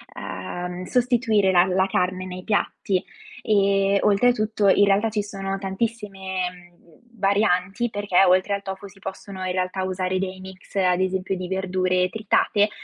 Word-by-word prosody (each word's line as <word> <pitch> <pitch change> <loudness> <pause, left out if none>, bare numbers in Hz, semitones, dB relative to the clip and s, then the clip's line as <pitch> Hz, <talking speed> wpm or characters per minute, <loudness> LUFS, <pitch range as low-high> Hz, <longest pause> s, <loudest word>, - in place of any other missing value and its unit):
ehm, 180 - -6
sostituire 235 -5 +2
la 175 -1 +5
la 190 +1 +1
carne 185 0 -1
nei 185 0 -7
piatti. 200 -2 0 0.4
E 200 -2 +3
oltretutto 215 0 +2
in 200 +1 +5
realtà 200 +3 +2
ci 210 -1 -1
sono 195 -1 -4
tantissime, 195 -2 -3
mhmm, 175 -2 -20 0.2
varianti, 200 +2 +1
perché 205 -3 +2
oltre 185 +2 +3
al 200 - -2
tofu, 195 +1 -6
si 195 0 -17
possono 190 0 -7
in 185 - -1
realtà 185 +1 -2
usare 185 0 -1
dei 190 0 -4
mix 190 0 -13
ad 185 -2 +2
esempio 190 0 -1
di 180 -1 -5
verdure 185 -1 0
tritate, 210 0 +2
190 Hz, 150 wpm, -23 LUFS, 185-205 Hz, 0.4 s, la